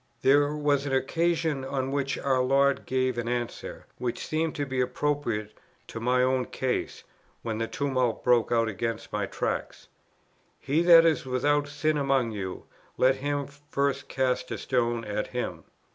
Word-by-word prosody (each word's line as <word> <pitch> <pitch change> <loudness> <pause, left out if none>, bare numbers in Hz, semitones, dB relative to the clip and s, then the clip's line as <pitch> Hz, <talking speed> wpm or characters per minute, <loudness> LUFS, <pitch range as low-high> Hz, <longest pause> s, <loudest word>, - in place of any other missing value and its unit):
There 145 +2 +4
was 145 -1 +1
an 135 - -2
occasion 160 +1 0
on 135 0 -2
which 140 -1 -1
our 130 -2 +1
Lord 140 +2 +2
gave 130 -2 0
an 120 - -3
answer, 120 -1 -4
which 120 -1 -3
seemed 160 0 -1
to 145 -2 -1
be 130 -1 -1
appropriate 125 -5 -1 0.3
to 115 - -6
my 125 +2 +2
own 130 0 +1
case, 130 -1 -3 0.4
when 110 -1 -3
the 115 - -1
tumult 130 -4 -1
broke 120 -2 +3
out 115 -1 +3
against 115 +2 -4
my - - -1
Tract: - - -4 0.7
"He 145 +4 +1
that 170 -1 +8
is 160 -4 +2
without 145 +3 +1
sin 150 +1 0
among 135 -4 +1
you, 95 -3 -5 0.3
let 130 +1 +4
him 145 +1 -2
first 140 -1 -3
cast 130 -1 0
a - - -3
stone 120 -2 0
at 105 0 -2
him." 90 -10 -4
130 Hz, 160 wpm, -27 LUFS, 120-145 Hz, 0.7 s, that